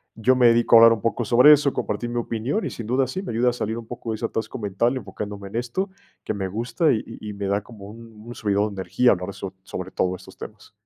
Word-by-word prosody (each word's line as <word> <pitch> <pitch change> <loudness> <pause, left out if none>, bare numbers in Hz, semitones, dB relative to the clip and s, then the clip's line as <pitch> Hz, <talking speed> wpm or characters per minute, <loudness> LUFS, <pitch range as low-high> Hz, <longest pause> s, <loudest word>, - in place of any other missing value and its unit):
yo 125 +3 +2
me 120 -2 +6
dedico 115 0 +4
a - - +10
hablar 115 0 +8
un 110 - -4
poco 115 +1 -1
sobre 125 +7 +7
eso, 145 -2 +4
compartir 120 - -3
mi 120 - -4
opinión, 115 - -2
y - - -2
sin 115 -2 -7
duda 130 +2 +2
sí 185 +10 -4
me 155 - -5
ayuda 120 +2 +2
a - - -2
salir 110 -2 -3
un 115 - -7
poco 115 -1 -6
de - - -2
ese 110 - -4
atasco 110 -1 -4
mental, 105 +5 0
enfocándome 100 -2 -6
en 115 - -5
esto, 125 - -2 0.3
que - - -3
me 95 -2 -3
gusta, 120 - 0
y 110 - -1
y 110 -2 -9
y - - -8
me 100 -1 -4
da 100 +1 0
como 105 -3 -12
un 115 +1 -12
un 120 - -8
subidón 105 -1 0
de 95 - -4
energía 110 +8 +3
hablar 90 +1 -2
so 95 -1 -7
sobre 95 0 -7
todo 90 0 0
estos - - -14
temas. - - -11
115 Hz, 270 wpm, -23 LUFS, 100-120 Hz, 0.3 s, a